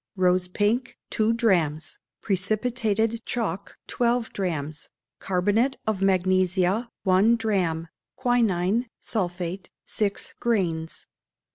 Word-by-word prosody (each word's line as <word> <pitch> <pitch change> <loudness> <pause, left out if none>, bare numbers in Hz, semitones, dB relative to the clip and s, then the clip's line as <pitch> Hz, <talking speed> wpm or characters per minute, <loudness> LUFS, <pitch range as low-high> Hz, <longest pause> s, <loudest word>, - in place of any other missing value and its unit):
Rose 180 -1 +2
pink, 215 +7 0
two 220 0 +2
drachms; 170 -10 +1 0.2
precipitated 220 +3 0
chalk, 200 -6 -3
twelve 240 -1 0
drachms; 155 -6 -3 0.3
carbonate 205 +8 +1
of 215 -3 -1
magnesia, 185 +3 +2
one 195 +4 +4
drachm; 185 -8 0 0.3
quinine 235 -3 +1
(sulphate), 180 -2 -3 0.2
six 205 -2 -2
grains. 170 -8 -1
195 Hz, 90 wpm, -25 LUFS, 180-225 Hz, 0.3 s, one